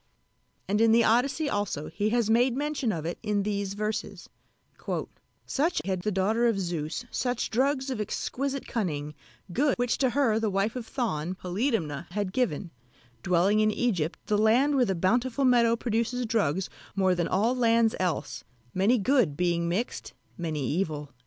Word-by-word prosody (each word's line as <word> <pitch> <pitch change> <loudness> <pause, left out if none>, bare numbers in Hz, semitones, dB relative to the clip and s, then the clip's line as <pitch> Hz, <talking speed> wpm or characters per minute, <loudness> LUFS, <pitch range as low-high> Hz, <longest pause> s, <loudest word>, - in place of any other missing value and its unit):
And 205 +2 +1
in 225 0 +5
the 235 0 +5
Odyssey 275 +7 +2
also 205 - -2
he 205 +6 -1
has 235 -1 +1
made 240 +3 +3
mention 290 -5 -1
of 160 -5 -4
it 170 - -4
in 210 -2 0
these 200 -1 -2
verses: 215 +2 -4 1.2
"Such 320 +5 0
had 190 -2 -1
the 210 - -1
daughter 215 +5 +2
of 225 -4 +1
Zeus, 160 -5 -3
such 245 -2 -1
drugs 265 +2 +1
of 235 -5 -2
exquisite 275 +6 -3
cunning, 150 -9 -2 0.4
Good, 280 +4 +2
which 245 -1 0
to 260 - +3
her 240 -5 +2
the 225 -1 0
wife 195 +4 0
of 240 -3 -5
Thon, 185 - -2
Polydamna, 180 - -2
had 205 -3 -2
given, 200 - -1 0.5
Dwelling 180 - +3
in 215 0 +4
Egypt, 200 -8 0
the 210 -1 +1
land 245 +7 +4
where 255 -2 +4
the 190 - -1
bountiful 240 +9 +1
meadow 235 -2 +4
produces 235 +2 -1
Drugs 195 -6 0 0.3
more 190 -2 +3
than 175 -2 0
all 220 +7 +1
lands 230 -2 +3
else, 180 -4 -2 0.3
many 200 +7 +3
good 220 - +2
being 170 -1 +1
mixed, 205 +8 -3 0.2
many 155 -5 -3
evil." 150 -3 -2
215 Hz, 165 wpm, -27 LUFS, 180-245 Hz, 1.2 s, in